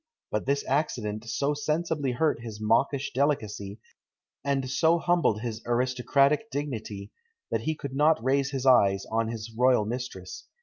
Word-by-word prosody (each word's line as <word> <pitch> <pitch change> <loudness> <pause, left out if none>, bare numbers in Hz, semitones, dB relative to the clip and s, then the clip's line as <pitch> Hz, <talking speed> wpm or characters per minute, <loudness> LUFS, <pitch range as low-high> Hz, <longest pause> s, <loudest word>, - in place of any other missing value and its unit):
But 105 +4 -2
this 140 +1 +1
accident 120 -7 -1
so 140 +4 0
sensibly 150 -2 -1
hurt 150 -1 +1
his 110 -3 -7
mawkish 130 +6 +1
delicacy, 110 -7 -1 0.6
and 140 -2 0
so 160 +5 +3
humbled 170 -11 +1
his 115 -2 -4
aristocratic 130 - +2
dignity, 110 - -5 0.4
that - - 0
he 160 - -1
could 140 -3 -7
not 150 +3 +4
raise 135 +1 +2
his 135 -1 -4
eyes 100 -7 +4
on 115 0 +1
his 115 0 -6
royal 125 -2 +4
mistress. 110 -6 -6
130 Hz, 145 wpm, -27 LUFS, 110-145 Hz, 0.6 s, not